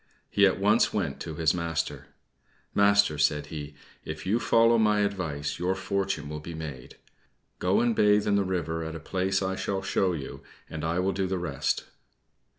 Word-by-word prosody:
He 100 0 +5
at 95 - 0
once 105 +4 +3
went 85 -10 -2
to 80 -2 -6
his 80 -1 +2
master. 80 -5 -3 0.7
"Master," 100 -6 +4
said 75 0 +2
he, 75 -1 -6 0.3
"if - - -7
you 105 +5 +2
follow 115 0 +4
my 105 -1 +3
advice, 85 -9 -2
your 90 +2 0
fortune 95 -4 -2
will 75 +1 -5
be 85 +2 -8
made. 75 -6 -8 0.6
Go 90 +2 +2
and 120 -1 +2
bathe 105 0 +4
in 105 - +2
the 100 - +3
river 85 -3 -2
at 80 0 -5
a - - -5
place 95 +4 -1
I 95 0 -1
shall 95 0 -2
show 95 -1 +1
you, 70 -5 -6 0.3
and 80 -1 -6
I 80 +2 0
will 95 +1 +1
do 95 0 -1
the 95 0 -1
rest." 80 -7 -1
90 Hz, 185 wpm, -27 LUFS, 80-100 Hz, 0.7 s, He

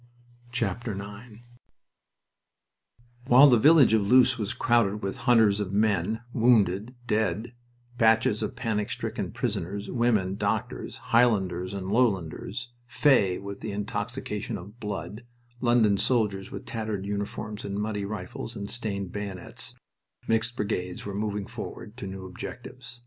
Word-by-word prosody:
IX 110 -1 -4 1.8
While 130 +4 +8
the 120 -3 +5
village 145 -2 +6
of 110 - +4
Loos 125 +4 +5
was 105 -1 -2
crowded 105 -3 +2
with 95 - -2
hunters 110 -4 +5
of 100 -2 -3
men, 105 0 +1
wounded, 110 -1 +3
dead, 110 +1 0 0.5
batches 110 -1 +4
of - - -3
panic 110 -4 -1
stricken - - -3
prisoners, 100 +4 -3
women, 110 -6 +1
doctors, 110 +5 -2 0.2
Highlanders 95 -6 +2
and 95 0 -4
Lowlanders 110 0 0 0.2
"fey" 120 -9 +3
with 100 0 -7
the - - -4
intoxication 100 0 -3
of 105 +6 -12
blood, 105 +1 -5 0.4
London 120 -5 +4
soldiers 105 -6 +1
with - - -8
tattered 110 -4 -3
uniforms 105 +1 -4
and 100 0 -4
muddy 105 -1 -2
rifles 105 +3 -6
and 100 -1 -5
stained 100 -6 -2
bayonets, 100 -3 -5 0.5
mixed 115 +1 +1
brigades 90 -5 -3
were 100 - -4
moving 105 0 -2
forward 105 - -8
to 100 - -6
new 95 0 -7
objectives. 120 +6 -9
105 Hz, 125 wpm, -27 LUFS, 100-115 Hz, 1.8 s, While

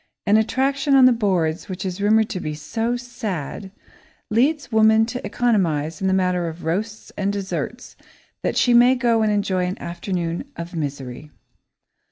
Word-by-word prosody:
An 205 0 +4
attraction 270 +5 +2
on 265 -1 +7
the 255 - +7
boards 185 -9 0
which 185 +2 -5
is 185 +1 -4
rumoured 215 +1 +4
to 200 -4 -3
be 155 -3 -4
"so 225 +11 -2
sad," 205 - -5 0.6
leads 280 +6 +1
woman 220 0 +5
to 245 +2 -6
economise 175 -9 0
in 190 - +1
the - - +2
matter 180 -2 +1
of 165 +1 -7
roasts 210 +7 -3
and 200 0 -1
desserts 195 - -5 0.5
that - - -1
she 245 - +4
may 245 +2 +6
go 235 -3 +2
and 215 -1 +2
enjoy 190 -3 0
an 185 - -5
afternoon 170 +1 -3
of 170 +1 -7
misery. 140 -2 -5
200 Hz, 165 wpm, -22 LUFS, 170-230 Hz, 0.6 s, on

